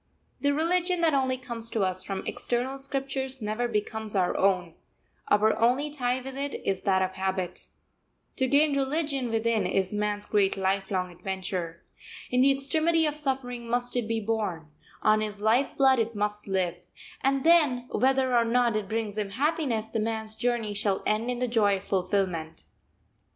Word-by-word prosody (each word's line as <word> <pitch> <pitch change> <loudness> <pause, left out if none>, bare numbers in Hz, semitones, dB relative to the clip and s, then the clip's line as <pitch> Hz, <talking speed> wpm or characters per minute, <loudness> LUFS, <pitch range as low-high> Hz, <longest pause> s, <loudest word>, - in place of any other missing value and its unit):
The 285 - +2
religion 350 +4 +1
that 325 -2 +3
only 260 -2 +1
comes 235 -3 -4
to 220 -4 0
us 185 0 0
from 195 0 -5
external 255 +3 -2
scriptures 270 -1 -3
never 215 +2 -1
becomes 215 -1 -1
our 185 -2 +1
own; 180 -3 +1 0.5
our 215 +1 +3
only 255 +6 +2
tie 250 -3 0
with 265 +1 -8
it 280 +1 -3
is 195 -1 0
that 190 -2 +2
of 185 - -1
habit. 190 -1 -3 0.7
To 260 - +2
gain 285 +2 +3
religion 275 -2 -1
within 225 0 +1
is 190 0 0
man's 210 0 -1
great 200 -2 +2
lifelong 190 -1 -1
adventure. 180 -2 -5 0.5
In 250 0 +3
the 275 +1 +6
extremity 315 +4 +1
of 300 -1 -1
suffering 255 -5 -3
must 245 +1 0
it 240 -3 0
be 225 0 0
born; 205 -8 -3 0.3
on 215 0 +4
his 210 -1 -4
life 225 +6 +2
blood 265 -2 +5
it 230 0 -1
must 210 0 -2
live; 180 -3 -1 0.4
and 270 0 +2
then, 295 -8 +4
whether 260 -1 +2
or 235 - +5
not 235 0 +2
it 210 -2 -2
brings 215 -2 -2
him 205 -2 -2
happiness, 260 -2 0
the 225 0 -3
man's 220 0 -2
journey 235 -2 -1
shall 200 -1 0
end 215 +3 0
in 250 - -1
the 250 +1 -1
joy 210 -4 +2
of 190 - -10
fulfilment. 180 -4 -1
230 Hz, 170 wpm, -27 LUFS, 200-265 Hz, 0.7 s, the